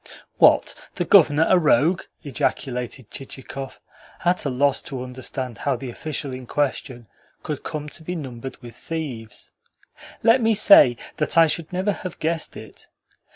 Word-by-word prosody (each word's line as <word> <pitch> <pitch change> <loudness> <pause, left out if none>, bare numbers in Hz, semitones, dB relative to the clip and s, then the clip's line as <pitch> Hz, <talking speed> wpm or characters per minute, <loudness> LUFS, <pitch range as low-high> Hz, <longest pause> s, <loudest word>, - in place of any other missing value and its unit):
"What? - - +5 0.2
The 175 - -1
Governor 160 -5 +5
a 185 - +5
rogue?" 165 +2 +3 0.2
ejaculated 125 -3 -3
Chichikov, 135 0 -8 0.5
at 175 -1 +2
a - - +1
loss 140 +2 +1
to 130 -3 -5
understand 130 -2 -6
how 140 -2 0
the 125 0 -6
official 145 0 -5
in 130 -1 -8
question 130 -4 -2 0.4
could 150 -3 -4
come 150 -2 -5
to 160 - -6
be 180 +3 -4
numbered 130 -4 -7
with 120 -2 -11
thieves. 125 -7 -6 0.7
"Let 230 +3 +5
me 225 -1 +3
say 200 - +7 0.2
that 150 - 0
I 165 - +8
should 160 +1 -1
never 185 +3 0
have 185 -3 -7
guessed 165 0 -2
it. - - -12
145 Hz, 155 wpm, -23 LUFS, 130-165 Hz, 0.7 s, I